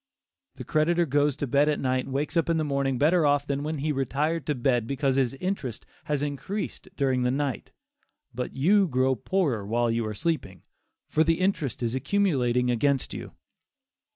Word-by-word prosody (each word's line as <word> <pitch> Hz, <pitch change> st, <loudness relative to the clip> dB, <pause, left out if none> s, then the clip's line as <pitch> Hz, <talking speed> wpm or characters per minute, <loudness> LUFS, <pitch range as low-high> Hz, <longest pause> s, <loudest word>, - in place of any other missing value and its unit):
The -, -, -7 dB
creditor 170 Hz, +3 st, +2 dB
goes 145 Hz, -1 st, +2 dB
to -, -, -2 dB
bed 140 Hz, +3 st, +3 dB
at 150 Hz, -, 0 dB
night 130 Hz, -1 st, 0 dB
and -, -, -8 dB
wakes 145 Hz, +5 st, -2 dB
up 165 Hz, 0 st, +2 dB
in 165 Hz, -, +2 dB
the 155 Hz, -, +1 dB
morning 140 Hz, -3 st, 0 dB
better 160 Hz, +5 st, +3 dB
off 145 Hz, -1 st, +2 dB
than 140 Hz, -1 st, -2 dB
when 155 Hz, +1 st, -3 dB
he 150 Hz, +2 st, -1 dB
retired 145 Hz, +4 st, -1 dB
to 150 Hz, -, +1 dB
bed 120 Hz, -2 st, +1 dB
because 135 Hz, 0 st, 0 dB
his 135 Hz, -1 st, +1 dB
interest 135 Hz, -, -4 dB, 0.2 s
has 145 Hz, -1 st, -1 dB
increased 150 Hz, +9 st, -4 dB
during 130 Hz, -3 st, +1 dB
the 125 Hz, -, +2 dB
night, 135 Hz, -2 st, -2 dB, 0.6 s
but 125 Hz, +1 st, -4 dB
you 190 Hz, +8 st, +4 dB
grow 130 Hz, -2 st, +2 dB
poorer 135 Hz, -, 0 dB
while 115 Hz, +3 st, 0 dB
you 115 Hz, 0 st, 0 dB
are 105 Hz, -, -4 dB
sleeping, 125 Hz, -, -3 dB, 0.4 s
for 155 Hz, -, +2 dB
the 165 Hz, +1 st, +1 dB
interest 175 Hz, -, -1 dB
is 115 Hz, 0 st, -1 dB
accumulating 130 Hz, -5 st, +1 dB
against 135 Hz, +3 st, +1 dB
you. -, -, -7 dB
140 Hz, 185 wpm, -26 LUFS, 125-155 Hz, 0.6 s, you